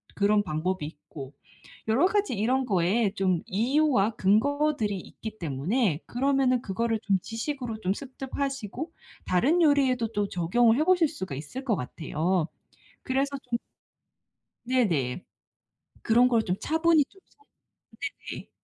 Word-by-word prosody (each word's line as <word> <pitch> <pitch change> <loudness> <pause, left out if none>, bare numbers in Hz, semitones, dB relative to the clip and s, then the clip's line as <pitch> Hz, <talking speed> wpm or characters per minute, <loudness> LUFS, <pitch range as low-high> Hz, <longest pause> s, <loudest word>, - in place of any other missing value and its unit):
그런 205 +1 +3
방법이 180 +1 -2
있고 150 -3 -10 0.5
여러 250 +11 +4
가지 410 -5 0
이런 255 +6 +1
거에 200 +1 +2
좀 185 -3 +1
이유와 240 +1 +2
근거들이 225 +2 +2
있기 215 +4 -9
때문에 165 - 0
그러면은 260 -1 +2
그거를 225 +3 -1
좀 195 -2 +2
지식으로 230 0 -4
좀 185 +1 +1
습득하시고 270 - -5 0.3
다른 275 - +3
요리에도 270 -6 +3
또 205 -1 0
적용을 225 +7 +3
해보실 350 +1 +4
수가 190 - -6
있을 150 - -7
것 230 -5 +2
같아요. 160 +4 -1 0.6
그래서 275 +2 0
좀 235 - +1 1.1
네네. 180 - 0 0.8
그런 240 +2 +5
걸 235 -3 +3
좀 180 - -1
차분히 320 -1 +3
좀 385 - -22
서 430 - -29 0.9
네네. - - -8
225 Hz, 270 characters per minute, -27 LUFS, 185-275 Hz, 1.1 s, 그런